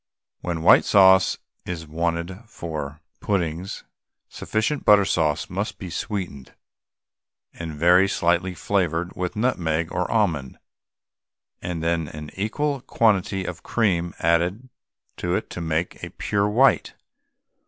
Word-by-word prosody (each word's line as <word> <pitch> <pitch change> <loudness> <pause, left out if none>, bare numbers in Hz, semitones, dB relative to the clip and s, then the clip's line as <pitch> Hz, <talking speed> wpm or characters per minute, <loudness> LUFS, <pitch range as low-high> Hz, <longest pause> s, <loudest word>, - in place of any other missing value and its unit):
When 85 -2 -3
white - - +7
sauce 95 -1 +5 0.3
is 85 -3 -5
wanted 85 +3 -2
for 80 -6 -6 0.2
puddings, 90 -2 -2 0.5
sufficient 110 +7 -2
butter 105 -1 +6
sauce 80 -4 0
must 100 +2 -4
be 90 -3 -7
sweetened, 80 - -5 1.0
and 80 -2 -6
very 90 +5 +5
slightly 90 0 +1
flavoured 90 -2 -1
with 90 +3 -3
nutmeg 85 -8 0
or 90 - -1
almond, 85 - 0 1.0
and 85 -2 -4
then 85 -1 0
an 75 0 -8
equal 140 +8 -2
quantity 100 -5 +1
of 90 0 -6
cream 90 -7 0
added 90 +9 +1 0.5
to 90 0 -1
it - - -3
to 90 - -5
make 80 +1 -2
it - - -18
a - - -8
pure 100 0 -1
white. 130 +5 +3
90 Hz, 125 wpm, -23 LUFS, 80-100 Hz, 1.0 s, white